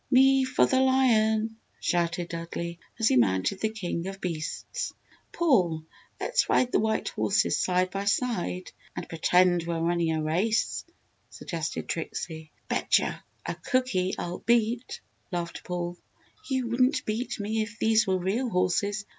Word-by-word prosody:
"Me 270 0 +6
for 260 +1 +3
the 260 - +2
lion!" 225 -4 +3 0.2
shouted 175 0 0
Dudley, 170 0 -5 0.2
as 225 -1 +2
he 130 - +4
mounted 105 - +2
the 220 - +1
king 185 -5 -4
of 195 0 -6
beasts. 175 - -4 0.4
"Paul, 185 - +2 0.4
let's - - +1
ride 250 - +3
the - - +3
white 220 0 0
horses - - +1
side 185 0 +1
by 195 +1 -3
side 195 -4 -1 0.2
and - - -5
pretend 175 +1 +3
we're 170 -1 -1
running 170 0 +1
a 160 -1 -1
race," 190 +9 0 0.4
suggested 160 -2 -4
Trixie. 160 -1 -5 0.2
"Bet'che - - +1 0.3
a - - -2
cookie 255 -8 0
I'll 175 +1 -4
beat!" 235 +1 +1 0.3
laughed 170 -1 -4
Paul. 175 0 -4 0.5
"You 260 -2 0
wouldn't 255 +2 +2
beat 220 +3 -2
me 215 +2 -1
if 215 0 -5
these 220 -1 +3
were 190 -1 +2
real 205 +8 -1
horses! 200 +2 0
195 Hz, 145 wpm, -27 LUFS, 170-230 Hz, 0.5 s, Me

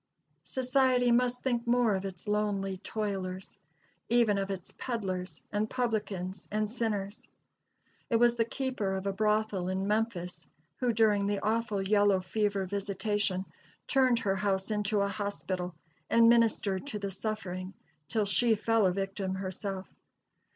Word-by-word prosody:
Society 255 -1 +3
must 250 +1 +2
think 240 -2 0
more 240 -2 +3
of 190 0 -2
its 190 0 -7
lonely 205 -2 0
toilers; 195 -2 -4 0.5
even 230 -4 +4
of 195 0 -2
its 190 -2 -5
peddlers 190 -7 -3
and 210 +1 0
publicans 210 -6 -2
and 215 0 -1
sinners. 210 -4 -2 0.8
It 235 - +2
was 240 +1 +5
the 230 - +3
keeper 235 -5 -2
of 190 0 -3
a 195 - 0
brothel 210 -2 +1
in 190 +1 -1
Memphis, 180 -7 -2 0.3
who, 250 -2 +1
during 210 -3 +3
the 205 0 0
awful 215 -2 0
yellow 205 -2 +4
fever 200 +1 0
visitation, 200 0 -1 0.4
turned 260 -3 +3
her 195 -4 0
house 190 +1 0
into 210 0 +1
a 200 - +2
hospital, 190 -3 -3 0.3
and 230 0 +6
ministered 230 -2 +3
to 220 - -3
the 200 -1 -4
suffering 190 -2 -4 0.3
till 220 -2 +1
she 220 +4 +4
fell 220 -1 +3
a - - +2
victim 195 0 -2
herself. 190 0 -4
205 Hz, 145 wpm, -30 LUFS, 195-230 Hz, 0.8 s, and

